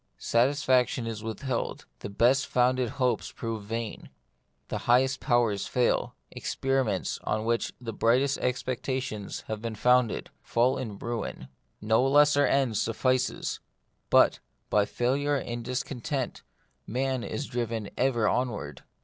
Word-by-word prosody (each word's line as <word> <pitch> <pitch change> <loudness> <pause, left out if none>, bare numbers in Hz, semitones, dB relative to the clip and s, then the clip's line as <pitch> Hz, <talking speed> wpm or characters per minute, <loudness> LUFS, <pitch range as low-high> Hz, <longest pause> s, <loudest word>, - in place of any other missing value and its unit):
Satisfaction 125 -1 +2
is 115 -2 -4
with 110 -2 -5
held; 130 -4 -3
the - - -6
best 125 +7 +3
founded 125 0 +2
hopes 125 -2 0
prove 115 -2 -4
vain; 110 +1 -5 0.6
the - - -2
highest 130 +2 +4
powers 115 -5 +1
fail; 125 -1 +1 0.2
experiments, 135 -4 -1
on 110 +1 -1
which 115 0 0
the 115 -2 -6
brightest 130 +6 +2
expectations 125 -3 -3
have 110 -1 -5
been 115 -1 -4
founded, 125 +1 +2
fall 125 +3 +1
in 105 -5 -5
ruin; 115 - -5 0.3
no 110 +3 +3
lesser 145 +1 +5
end 130 -6 +2
suffices; 130 +4 0 0.5
but, - - +5 0.3
by 105 0 +4
failure 140 +6 0
and 120 -3 -3
discontent, 125 +1 -3 0.5
man 130 +1 -1
is 145 - -4
driven 115 -4 -3
ever 120 -4 +2
on 125 +1 +1
ward. 75 - -7
120 Hz, 130 wpm, -28 LUFS, 115-130 Hz, 0.6 s, lesser